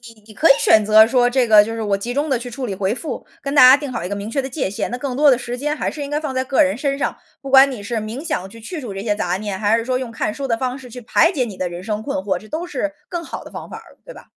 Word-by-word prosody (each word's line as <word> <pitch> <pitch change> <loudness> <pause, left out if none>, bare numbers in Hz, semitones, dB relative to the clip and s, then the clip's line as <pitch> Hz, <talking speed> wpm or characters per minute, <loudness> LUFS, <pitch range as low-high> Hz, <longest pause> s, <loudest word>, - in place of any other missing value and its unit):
你 215 - -23
你 215 - -13
可 320 - +2
以 - - +11
选 215 -1 +4
择 215 +1 +7
说 245 -1 +3
这 250 -1 +1
个 215 -1 +7
就 225 +2 -5
是 230 - -4
我 205 -2 0
集 240 +5 -5
中 290 +4 -1
地 265 - +2
去 245 +1 -7
处 255 +2 -5
理 200 -5 -4
回 195 +1 -1
复。 270 +1 -6 0.2
跟 280 +1 -4
大 280 - +7
家 260 - +9
定 285 -2 -5
好 240 - -4
一 180 - -4
个 205 - -3
明 200 +1 -6
确 275 +4 -1
的 265 - -6
界 260 -7 -2
限， 205 - -4
那 245 - -3
更 260 -1 -4
多 290 0 +6
的 250 - +3
时 245 0 -5
间 295 +3 -2
还 - - -2
是 300 - -6
应 280 - -6
该 295 +1 -1
放 300 -4 -4
在 260 - +1
个 265 +1 +2
人 190 +3 +2
身 275 +1 -1
上。 - - -2 0.3
不 275 - -7
管 270 +1 +7
你 240 - -7
是 230 +3 -5
冥 220 +7 -5
想 295 - -3
去 230 +2 -13
去 330 +8 -6
除 240 -8 -7
这 195 - -5
些 210 -1 -1
杂 180 -2 -1
念， 200 -2 -5
还 215 +1 +2
是 230 - -3
说 255 -1 0
用 255 -3 -5
看 215 - -2
书 275 -1 -5
的 230 - +1
方 255 +1 -3
式 260 -2 -12
去 250 +2 -9
排 320 +8 +3
解 265 -9 -1
你 200 -5 -8
的 185 - -2
人 175 +1 -8
生 215 0 -3
困 285 +3 -3
惑， 200 -8 -1
这 215 - -13
都 330 +6 -4
是 305 -4 -3 0.2
更 345 -1 -4
好 - - -7
的 - - -11
方 - - -8
法 - - -8
儿， - - -16
对 - - -10
吧？ - - -14
245 Hz, 375 characters per minute, -20 LUFS, 215-275 Hz, 0.3 s, 以